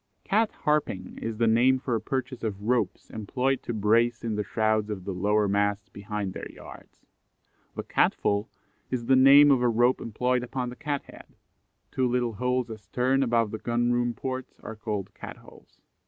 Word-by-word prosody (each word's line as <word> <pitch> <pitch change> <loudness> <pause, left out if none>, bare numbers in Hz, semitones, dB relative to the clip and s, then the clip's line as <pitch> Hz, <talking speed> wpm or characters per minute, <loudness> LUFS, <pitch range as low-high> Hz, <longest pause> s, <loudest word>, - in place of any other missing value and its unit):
Cat 220 +2 +2
harping 150 - -1
is 115 -1 -4
the 115 - +2
name 120 +4 +4
for 130 -1 -3
a 115 - 0
purchase 130 -2 -3
of 105 -3 -4
ropes 120 +2 -1
employed 125 +5 -1
to - - -5
brace 115 +2 +2
in 115 -2 -2
the 105 - -1
shrouds 110 0 0
of 100 -3 -5
the 100 - -3
lower 105 +3 +1
masts 100 0 0
behind 100 -1 -5
their - - -7
yards. - - -14 0.7
The - - -4
Cat - - +2
fall 100 +2 -1 0.4
is 125 -2 -3
the 130 - +4
name 140 +2 +8
of 130 -3 +3
a 125 - +3
rope 120 +2 +2
employed 125 +3 0
upon 125 0 -4
the 125 - -8
Cat 145 +1 -3
head. - - -15 0.6
Two 130 -1 +1
little 120 -1 0
holes 125 +2 -1
astern, 125 +5 0
above 115 -4 +1
the 110 - -5
Gun 120 0 0
room 120 -1 0
ports, 130 +1 -6
are 110 - -7
called 105 -3 -4
Cat - - -9
holes. - - -18
120 Hz, 185 wpm, -27 LUFS, 105-125 Hz, 0.7 s, name